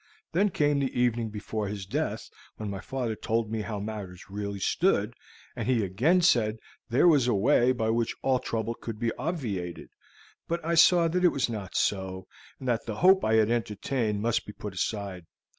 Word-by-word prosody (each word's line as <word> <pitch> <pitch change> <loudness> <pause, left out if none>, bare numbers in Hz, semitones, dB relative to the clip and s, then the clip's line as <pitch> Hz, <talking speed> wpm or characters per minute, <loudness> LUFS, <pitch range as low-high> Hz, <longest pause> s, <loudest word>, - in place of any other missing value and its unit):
Then 200 +5 +3
came 145 -4 +1
the 135 -3 -1
evening 120 -2 +1
before 105 0 -4
his 100 -1 -5
death, 95 - -3 0.3
when 105 -2 -4
my 100 - -5
father 120 -1 -3
told 115 0 -1
me 110 -1 -1
how 105 -1 -4
matters 100 -4 -7
really 100 0 -4
stood, 110 - +1 0.4
and 120 -2 -4
he 125 -4 +2
again 125 - +2
said 115 - +3
that 110 - -21 0.3
there 125 +9 +4
was 145 -7 +5
a 120 - +2
way 125 +4 +4
by 110 -3 0
which 115 0 0
all 130 -1 +2
trouble 115 -1 -2
could 115 -1 -7
be 115 +1 -1
obviated. 105 - -4 0.6
But 170 -1 -3
I 170 - 0
saw 170 +1 +6
that 180 +2 0
it - - +8
was 135 -6 -1
not 100 -5 -6
so, 95 -2 -1 0.3
and 130 - -8
that 120 -2 0
the 110 - -3
hope 190 - +5
I 110 - +3
had 110 0 +4
entertained 110 -1 -1
must 115 -1 0
be 105 - -7
put 105 -1 -7
aside. 95 -2 -3
115 Hz, 195 wpm, -28 LUFS, 105-130 Hz, 0.6 s, it